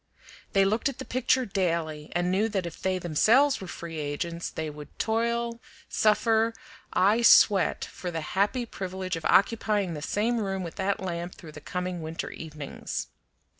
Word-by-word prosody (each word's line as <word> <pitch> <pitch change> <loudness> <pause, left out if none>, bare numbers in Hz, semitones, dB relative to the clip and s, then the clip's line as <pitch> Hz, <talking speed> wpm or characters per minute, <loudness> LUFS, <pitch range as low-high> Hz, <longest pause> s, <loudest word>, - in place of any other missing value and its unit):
They 195 -1 +5
looked 220 +8 +1
at 275 - -7
the - - -6
picture 255 +1 +1
daily 165 -6 -1
and 175 +1 +1
knew 210 +4 +2
that 195 -4 -1
if 170 - -8
they 190 0 +1
themselves 220 - +3
were 190 - -6
free 165 -2 -6
agents 165 +4 -3
they 160 - -4
would 150 -1 -10
toil, 235 +1 0 0.3
suffer, 225 +1 +3 0.4
ay 205 +5 +3
sweat, 205 -4 +5
for 180 - -6
the 165 -2 -3
happy 210 +6 +1
privilege 185 -4 -4
of 165 - -6
occupying 205 -3 +3
the 150 - -6
same 225 +8 0
room 195 -3 -2
with 170 - -7
that 195 +1 0
lamp 175 -1 -4
through 160 - -11
the 150 - -11
coming 180 +2 -3
winter 160 +1 -5
evenings. 150 -3 -6
190 Hz, 170 wpm, -27 LUFS, 170-220 Hz, 0.4 s, They